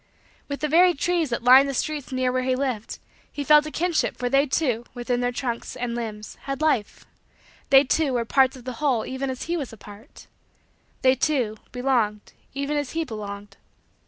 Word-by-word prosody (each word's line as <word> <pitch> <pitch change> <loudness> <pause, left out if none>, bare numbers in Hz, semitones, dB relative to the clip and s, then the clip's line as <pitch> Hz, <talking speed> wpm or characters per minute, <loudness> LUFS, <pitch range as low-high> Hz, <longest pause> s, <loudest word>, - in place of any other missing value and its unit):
With 280 -1 -5
the 305 - +1
very 350 +3 +5
trees 340 0 0
that 235 -1 -3
lined 260 +3 +7
the 275 - -3
streets 295 0 -3
near 255 -1 0
where 255 0 0
he 255 0 0
lived, 255 -5 -3 0.3
he 290 - -4
felt 300 +2 +5
a - - -4
kinship 345 0 0
for 245 0 -2
they, 275 +3 +3
too, 255 -5 0
within 245 0 -1
their 245 0 0
trunks 240 -1 -4
and 245 -1 -3
limbs, 215 -3 -6
had 275 -1 -3
life 300 -9 0 0.6
they, 270 0 +7
too, 290 0 +1
were 235 -1 0
parts 265 +2 +3
of 255 - -12
the 255 0 -5
whole 260 -7 +1
even 265 +1 -4
as 260 -1 -4
he 340 - -2
was 285 -7 -4
a 225 - -12
part 210 +6 -14 0.8
they, 260 0 +6
too, 260 -5 0 0.2
belonged 240 -5 -1 0.2
even 280 +2 -1
as 290 -3 -3
he 330 0 0
belonged. 205 -4 -8
260 Hz, 195 wpm, -24 LUFS, 240-290 Hz, 0.8 s, lined